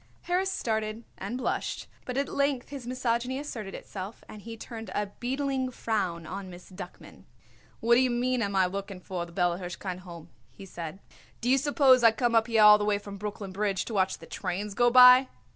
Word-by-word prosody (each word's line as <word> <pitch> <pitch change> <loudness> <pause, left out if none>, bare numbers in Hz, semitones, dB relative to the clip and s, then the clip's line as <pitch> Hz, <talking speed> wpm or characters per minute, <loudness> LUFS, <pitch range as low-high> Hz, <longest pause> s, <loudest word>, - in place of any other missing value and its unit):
Harris 370 +2 0
started 220 - -2 0.2
and 205 +6 -4
blushed, 260 - -2 0.2
but 250 0 -4
at 280 - +1
length 280 -3 -1
his 275 -4 -7
misogyny 250 0 -1
asserted 230 -9 -6
itself 195 +2 -8
and 210 - -10
he 225 +2 -8
turned 225 0 -8
a 205 -1 -2
beetling 265 +1 -1
frown 195 -9 -2
on 190 +3 -6
Miss 180 +1 -12
Duckman. 180 -1 -11 0.6
"What 235 +1 +4
d'ye 255 +1 +4
mean, 245 +1 0
am 200 -2 -1
I 190 -1 +4
looking 195 +1 -5
for 180 -1 -5
the - - -14
Bella 175 0 0
Hirshkind 180 0 -5
Home?" 170 -3 -11 0.2
he 195 - -12
said. 170 -2 -7 0.4
"Do 245 - 0
you 270 - +5
suppose 270 -3 +4
I 230 - +9
come 240 +1 0
up 225 0 +4
here 225 -2 +4
all 210 0 +9
the - - -1
way 210 -1 +2
from 200 0 -9
Brooklyn 205 -1 -5
Bridge 195 -1 -1
to 230 - -6
watch 190 -2 +1
the - - -13
trains 200 +3 -4
go 240 +4 +4
by?" 250 +1 +8
220 Hz, 200 wpm, -28 LUFS, 195-250 Hz, 0.6 s, I